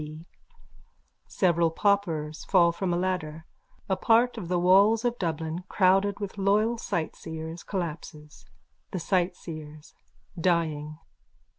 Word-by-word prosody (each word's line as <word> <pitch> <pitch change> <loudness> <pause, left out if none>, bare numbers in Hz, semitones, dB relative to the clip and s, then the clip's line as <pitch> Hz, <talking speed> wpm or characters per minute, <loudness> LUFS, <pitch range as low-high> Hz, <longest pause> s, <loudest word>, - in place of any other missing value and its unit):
B. 155 +2 -9 1.0
Several 170 -3 +2
paupers 165 -5 0
fall 175 -3 +4
from 180 +1 -2
a 175 - +1
ladder. 170 -4 -3 0.4
A - - +1
part 235 +2 +3
of 205 -7 -6
the 180 +1 0
walls 200 +6 +4
of 240 0 -1
Dublin, 165 0 -3
crowded 195 +1 +3
with 200 -1 -6
loyal 210 +4 +2
sightseers, 160 -1 -5
collapses.)_ 155 -5 -6 0.4
THE 185 - -4
SIGHTSEERS: 160 -4 -3 0.5
_(Dying.) 155 -3 0
175 Hz, 115 wpm, -27 LUFS, 160-195 Hz, 1.0 s, fall